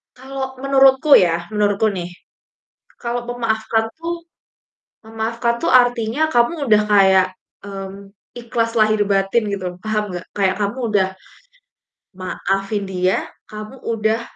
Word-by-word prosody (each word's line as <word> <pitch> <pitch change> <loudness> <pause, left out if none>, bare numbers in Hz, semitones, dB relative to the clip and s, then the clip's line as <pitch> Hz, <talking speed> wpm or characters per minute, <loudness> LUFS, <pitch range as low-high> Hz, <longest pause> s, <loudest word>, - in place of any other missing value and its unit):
Kalau 265 +1 -6
menurutku 275 +2 +6
ya, 170 0 +1
menurutku 210 0 +1
nih 180 -3 -5 0.9
kalau 240 0 -3
memaafkan 225 -2 0
tuh 335 0 -5 0.8
memaafkan 230 +2 -2
tuh - - +1
artinya 245 +1 +3
kamu 280 +2 +1
udah 210 -1 +6
kayak, 190 -2 +5 0.4
mmm, 195 0 -8 0.3
ikhlas 230 -1 -1
lahir 215 0 +3
batin 195 +4 +2
gitu, 195 -2 -4 0.2
paham 215 -1 0
gak? 175 0 -6
Kayak 190 -1 +2
kamu 205 +5 -1 0.2
udah 190 -2 +3 1.1
maafin 195 +2 -2
dia, 185 -1 0 0.3
kamu 215 +3 -8
udah, 225 0 0
220 Hz, 115 wpm, -20 LUFS, 195-240 Hz, 1.1 s, menurutku